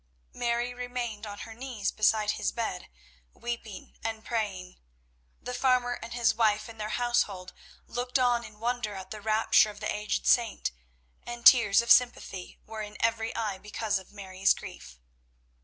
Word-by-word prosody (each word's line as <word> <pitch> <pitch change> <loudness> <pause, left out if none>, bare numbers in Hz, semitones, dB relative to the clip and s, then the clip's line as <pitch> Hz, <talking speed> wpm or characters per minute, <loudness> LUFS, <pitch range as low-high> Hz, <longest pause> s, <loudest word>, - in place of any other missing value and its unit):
Mary 240 0 -1
remained 245 -3 -4
on 205 0 -7
her 225 - -8
knees 235 -4 -3
beside 215 0 +2
his - - -1
bed, 220 -6 -4 0.5
weeping 235 -4 -7
and 220 -1 -4
praying. 195 -6 -3 0.6
The 250 - -6
farmer 250 -1 +2
and 230 - -8
his 235 -2 +2
wife 215 -2 +2
and 225 -1 -9
their 210 - -3
household 240 -7 0 0.3
looked 245 +2 -1
on 245 -2 +2
in 210 -2 -12
wonder 235 -3 -2
at 190 0 -8
the 215 -1 -6
rapture 215 0 +4
of 210 - -10
the - - -2
aged 210 0 -2
saint, 235 -3 +2 0.5
and 240 0 -8
tears 235 -4 +8
of 235 - 0
sympathy 240 -7 +3
were 220 0 -6
in 210 0 -7
every 230 0 0
eye 210 -4 -2
because 210 0 -2
of 190 - -15
Mary's 195 -1 +1
grief. - - -10
225 Hz, 160 wpm, -29 LUFS, 210-240 Hz, 0.6 s, tears